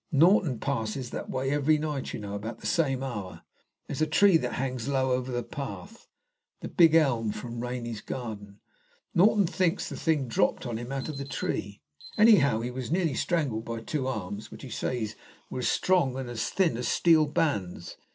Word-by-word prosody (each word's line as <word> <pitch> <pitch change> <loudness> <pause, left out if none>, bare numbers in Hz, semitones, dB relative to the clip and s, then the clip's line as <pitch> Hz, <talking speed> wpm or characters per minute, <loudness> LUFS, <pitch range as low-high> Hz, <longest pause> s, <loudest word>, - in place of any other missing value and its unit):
Norton 160 - +4
passes 125 -2 -2
that - - -5
way 135 +1 -1
every 145 +2 +3
night, 150 -3 -3
you - - -5
know, 100 -1 -6
about 110 +3 -5
the - - -12
same 135 -5 +1
hour. 105 -8 -6 0.4
There's 145 +1 -5
a 155 - +3
tree 195 +4 +5
that 125 -6 -3
hangs 130 -2 -3
low 130 -2 +1
over 125 0 -1
the 120 -1 -2
path 170 - -8 0.5
the - - -5
big 165 -3 +5
elm 120 -9 +3
from 115 +2 -6
Rainy's 120 -3 -4
garden. 105 -5 -7 0.5
Norton 200 +2 +5
thinks 180 -1 0
the - - -6
thing 155 -5 0
dropped 115 - +1
on 120 -2 -3
him 120 +3 -6
out 135 -1 -3
of 150 -3 -5
the - - -3
tree. 100 -7 -4 0.3
Anyhow, 175 - +6
he 120 +2 -3
was 125 0 -5
nearly 170 -4 +1
strangled 140 -9 0
by 115 -1 -4
two 130 +3 -2
arms, 105 -4 -4
which, - - -11
he 130 - -8
says, 110 -2 -2 0.4
were - - -3
as 125 - 0
strong 170 -9 +2
and 130 -2 -5
as 115 -2 -2
thin 175 -11 +1
as 120 0 -2
steel 160 0 +4
bands. 105 - -1
130 Hz, 190 wpm, -28 LUFS, 115-155 Hz, 0.5 s, Anyhow